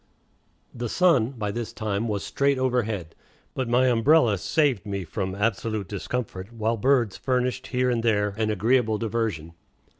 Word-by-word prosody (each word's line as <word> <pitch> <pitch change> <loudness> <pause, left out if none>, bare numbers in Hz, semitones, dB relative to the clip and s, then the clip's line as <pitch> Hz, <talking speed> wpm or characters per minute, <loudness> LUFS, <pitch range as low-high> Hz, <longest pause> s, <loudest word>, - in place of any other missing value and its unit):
The 120 -1 -4
sun 165 -10 +3
by 105 -5 -3
this 115 +1 -4
time 110 0 -2
was 105 -3 -2
straight 140 -1 +1
overhead, 110 -10 -1 0.4
but 130 -3 -3
my 125 +2 +4
umbrella 120 - +4
saved 130 - +1
me 100 -2 -4
from 95 +3 -4
absolute 110 -1 -1
discomfort, 100 0 -5
while 115 0 -1
birds 120 -2 +2
furnished 125 0 -1
here 125 0 +1
and 120 -1 0
there 105 -3 +2
an 110 0 0
agreeable 110 +2 +2
diversion. 105 -8 -2
115 Hz, 150 wpm, -25 LUFS, 105-125 Hz, 0.4 s, my